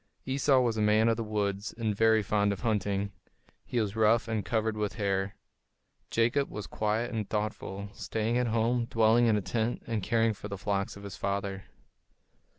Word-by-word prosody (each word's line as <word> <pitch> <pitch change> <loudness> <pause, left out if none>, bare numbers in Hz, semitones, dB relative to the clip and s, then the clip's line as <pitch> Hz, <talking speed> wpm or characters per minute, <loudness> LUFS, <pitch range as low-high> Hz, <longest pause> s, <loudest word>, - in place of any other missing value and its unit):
Esau 135 0 +3
was 115 -3 0
a - - +1
man 105 +1 +4
of 115 - +3
the 115 - -2
woods 105 -1 -2
and 110 -3 -1
very 110 0 +4
fond 100 +1 +1
of 100 - -4
hunting; 105 -4 0
and 100 0 -4 0.5
he 125 - -2
was 105 -2 -1
rough 110 +1 +3
and 110 -2 -1
covered 110 -1 0
with 105 -1 -2
hair. 100 -1 -1 0.7
Jacob 120 +5 +2
was 105 -2 -6
quiet 110 +6 -1
and 110 -3 -3
thoughtful, 105 -2 -3
staying 115 +1 -2
at 125 - +1
home, 115 +2 +1
dwelling 115 +1 +4
in 110 -2 +4
a - - 0
tent, 110 +5 -2
and 115 -2 -2
caring 115 +2 +2
for 105 - -8
the 100 -1 -5
flocks 100 0 -2
of 100 - -11
his 100 -2 -7
father. 100 0 -2
110 Hz, 190 wpm, -29 LUFS, 100-115 Hz, 0.7 s, man